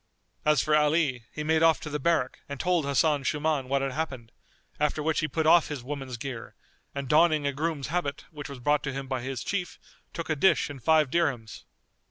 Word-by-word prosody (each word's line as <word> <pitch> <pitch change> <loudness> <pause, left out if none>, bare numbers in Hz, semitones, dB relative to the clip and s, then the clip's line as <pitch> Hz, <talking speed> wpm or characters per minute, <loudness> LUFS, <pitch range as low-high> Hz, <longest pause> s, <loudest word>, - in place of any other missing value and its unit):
As 150 -3 +4
for 150 - +2
Ali, 150 -5 +2
he 150 - -5
made 160 +1 +2
off 165 -1 +5
to 150 - -6
the 150 - -2
barrack 150 -4 0
and 140 -1 -6
told 180 -4 +1
Hasan 145 +1 +2
Shuman 150 -1 -1
what 140 0 +1
had 135 - -1
happened, 130 -6 -5 0.5
after 150 0 0
which 160 0 +1
he 155 - 0
put 155 +3 -2
off 165 +1 +6
his 145 -5 -6
woman's 135 -2 -5
gear 125 -2 -7 0.4
and 140 -1 -4
donning 155 +1 +4
a 140 - 0
groom's 150 -1 -2
habit 160 -4 -2
which 150 -2 -8
was 140 - -7
brought 145 +4 +1
to 135 - -3
him 135 0 -5
by 130 -2 -2
his 130 -1 -4
chief 195 -4 -3 0.3
took 170 - -5
a 155 - 0
dish 150 -1 +3
and 135 -3 -10
five 155 0 +3
dirhams. 135 -10 -1
145 Hz, 215 wpm, -27 LUFS, 135-160 Hz, 0.5 s, off